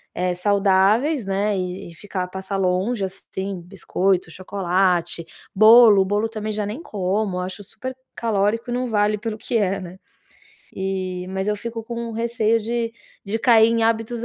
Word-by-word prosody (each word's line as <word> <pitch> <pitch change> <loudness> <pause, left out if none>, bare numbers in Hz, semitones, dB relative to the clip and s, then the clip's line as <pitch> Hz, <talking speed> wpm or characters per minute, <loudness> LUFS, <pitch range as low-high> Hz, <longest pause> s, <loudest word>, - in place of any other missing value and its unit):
eh, 180 0 0
saudáveis, 205 - +2
né, 200 +2 0
e 180 -1 -4
e - - -15
ficar 185 0 -4
passar 190 +2 -5
longe, 195 +4 0
assim, 190 0 -6
biscoito, 185 -1 -1
chocolate, 180 -2 0 0.3
bolo, 215 0 +8
o - - +2
bolo 205 +3 0
também 215 -1 -4
já 210 0 -2
nem 215 +9 -5
como, 195 - -2
eu - - -1
acho 185 +3 -6
super 255 +6 -7 0.2
calórico 225 +2 0
e - - -1
não 250 0 -1
vale 210 -1 +1
pelo 220 0 -4
que 230 +2 -1
é, 195 -1 0
né. 185 +1 -10 0.8
E 185 -1 -3
mas 190 +2 -3
eu 210 - +1
fico 230 +2 -6
com 235 0 -5
receio 230 0 +1
de 230 +1 -2 0.3
de 205 +3 -2
cair 225 -2 +6
em 230 0 +1
hábitos 225 +1 0
205 Hz, 170 wpm, -22 LUFS, 190-225 Hz, 0.8 s, bolo